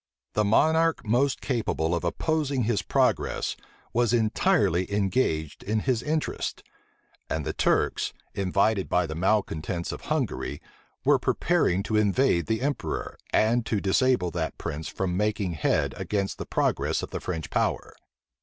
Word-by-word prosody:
The 105 - +2
monarch 160 +9 +3
most 125 +5 +1
capable 110 - -1
of 85 - -1
opposing 145 - 0
his 110 -1 +1
progress - - +1 0.4
was 120 0 +2
entirely 105 -5 +2
engaged 95 - 0
in 110 +1 -1
his 125 -2 0
interests; 155 +2 -2 0.7
and 80 -2 -2
the - - -2
Turks, - - +1 0.2
invited 100 +1 +1
by 90 0 +2
the 80 - -5
malecontents 85 -2 0
of - - -7
Hungary, - - -2 0.5
were - - +5
preparing 95 +3 +1
to 110 +1 0
invade 105 - +2
the 110 +2 0
emperor, 145 0 -2 0.2
and 115 +2 +3
to 105 - +1
disable 100 -1 +2
that 80 -1 -3
prince 75 +2 -4
from 90 -2 -2
making 105 -1 0
head 80 - +1
against 100 -2 -2
the - - -5
progress - - 0
of - - -6
the - - -3
French 80 -4 -4
power. - - -1
105 Hz, 145 wpm, -26 LUFS, 90-120 Hz, 0.7 s, were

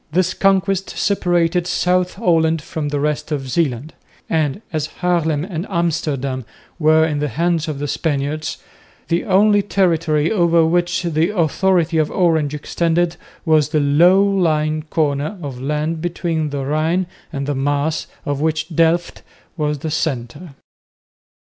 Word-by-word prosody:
This 185 +3 +1
conquest 195 0 +1
separated 175 -3 +1
South 180 0 +1
Holland 165 -5 +2
from 150 -1 -4
the 145 0 -1
rest 150 +2 -2
of 140 -3 -2
Zeeland; 135 0 -1 0.3
and, 160 +4 -1
as 155 -1 -1
Haarlem 165 -4 +1
and 180 -1 -5
Amsterdam 145 -7 -1 0.4
were 155 0 +4
in 150 -2 -1
the 150 - 0
hands 165 +5 0
of 155 -3 -3
the 145 +1 -3
Spaniards, 150 +1 -2 0.5
the 170 0 0
only 205 +1 +4
territory 165 -6 +1
over 170 -5 +3
which 175 +2 +1
the 165 0 +1
authority 170 0 +2
of 155 - +1
Orange 160 -5 +1
extended 170 +3 0 0.3
was 155 -3 +3
the 155 -1 +1
low 170 +7 +5
lying 155 -6 +1
corner 150 +4 -1
of 135 -6 -7
land 150 +3 -2
between 165 -2 -2
the 140 -1 -3
Rhine 160 +6 0 0.3
and 140 -2 -3
the 145 - -1
Maas, 145 +3 -1 0.2
of 145 0 -2
which 160 +1 -1
Delft 165 +2 +1 0.3
was 150 -2 -1
the 155 +3 -5
centre. 145 +1 -3
160 Hz, 145 wpm, -19 LUFS, 150-175 Hz, 0.5 s, low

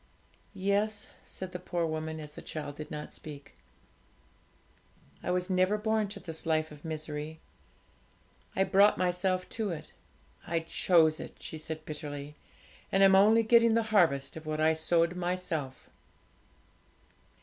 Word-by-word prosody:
'Yes,' 205 +2 0
said 185 -1 -7
the 180 - -5
poor 175 -1 -1
woman, 160 0 -3
as 150 -1 -7
the - - -9
child 145 -2 -6
did 155 0 -7
not 150 0 -6
speak; 145 -2 -8 1.7
'I - - -4
was 180 0 0
never 185 +2 +2
born 220 0 +1
to 200 +1 -6
this 165 -3 -5
life 155 -1 +1
of 150 -1 -13
misery, 155 -1 -5 1.2
I 190 - +3
brought 200 +2 +5
myself 185 +1 0
to 220 -3 -2
it. 165 -4 -6 0.5
I 165 0 0
chose 160 -1 +3
it,' - - -8
she 160 - -7
said 155 0 -5
bitterly; 150 -1 -6 0.6
'and 195 - +4
I'm 195 0 +7
only 215 +4 +6
getting 230 0 +5
the 230 - +3
harvest 140 -9 +3
of 160 -1 -9
what 155 0 -2
I 160 +1 +4
sowed 170 +2 +2
myself.' 175 -6 -3
170 Hz, 145 wpm, -30 LUFS, 155-190 Hz, 1.7 s, I'm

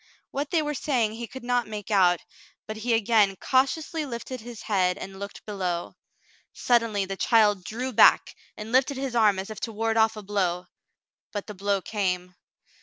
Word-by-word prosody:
What 280 +1 -3
they 325 -3 +1
were 295 0 -2
saying 250 -6 0
he 235 +1 -6
could 260 +3 -10
not 245 -1 0
make 210 0 -7
out, 180 -4 +4 0.4
but 215 - -6
he 230 +1 +1
again 215 -3 +3
cautiously 275 - 0
lifted 255 -1 -6
his 235 -1 -9
head 185 -3 +1
and 190 -1 -8
looked 200 0 -8
below. 185 -4 -3 0.6
Suddenly 230 -5 +1
the 195 +1 -5
child 205 -3 +3
drew 250 +6 -4
back - - +5 0.2
and 215 +1 -7
lifted 260 +3 +3
Frale's 265 0 -3
Confession 240 - +1
39 - - +4
his 215 - +6
arm - - -4
as 195 - -5
if 215 - -7
to 230 - -4
ward 225 +1 -1
off 220 0 +3
a 210 - -7
blow, 185 -3 -1 0.7
but 205 -2 -4
the 210 - -8
blow 200 0 -1
came. 180 -4 -2
215 Hz, 195 wpm, -26 LUFS, 195-245 Hz, 0.7 s, his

